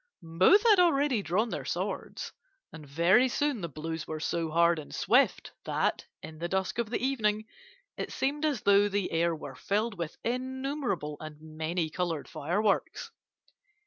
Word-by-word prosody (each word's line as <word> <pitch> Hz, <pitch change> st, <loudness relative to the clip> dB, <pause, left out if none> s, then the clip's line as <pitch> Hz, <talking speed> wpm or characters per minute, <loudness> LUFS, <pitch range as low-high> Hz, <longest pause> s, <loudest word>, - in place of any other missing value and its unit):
"Both 185 Hz, -, +4 dB
had 420 Hz, -4 st, +6 dB
already 285 Hz, -, +3 dB
drawn 205 Hz, +5 st, 0 dB
their -, -, -4 dB
swords, -, -, -4 dB, 0.4 s
and 155 Hz, -2 st, -10 dB
very 170 Hz, -, +4 dB
soon 285 Hz, -3 st, 0 dB
the 170 Hz, -, -4 dB
blows 160 Hz, +2 st, -5 dB
were 155 Hz, 0 st, -4 dB
so 165 Hz, +1 st, -1 dB
hard 170 Hz, +1 st, +3 dB
and 150 Hz, -, -9 dB
swift -, -, +2 dB
that, -, -, -1 dB, 0.2 s
in 155 Hz, -1 st, -9 dB
the 170 Hz, -, -2 dB
dusk 190 Hz, +4 st, -1 dB
of 235 Hz, -3 st, -1 dB
the 235 Hz, -, 0 dB
evening, 215 Hz, -5 st, 0 dB, 0.5 s
it -, -, -4 dB
seemed 290 Hz, +3 st, -1 dB
as 295 Hz, -7 st, 0 dB
though 200 Hz, 0 st, +4 dB
the 200 Hz, -2 st, -1 dB
air 165 Hz, 0 st, +1 dB
were 145 Hz, -3 st, -8 dB
filled 205 Hz, -, -2 dB
with 165 Hz, -2 st, -4 dB
innumerable 255 Hz, -, -2 dB
and 155 Hz, -1 st, -9 dB
many 160 Hz, +1 st, -3 dB
coloured 165 Hz, -3 st, -2 dB
fireworks. 200 Hz, +7 st, -1 dB
190 Hz, 160 wpm, -29 LUFS, 160-245 Hz, 0.5 s, had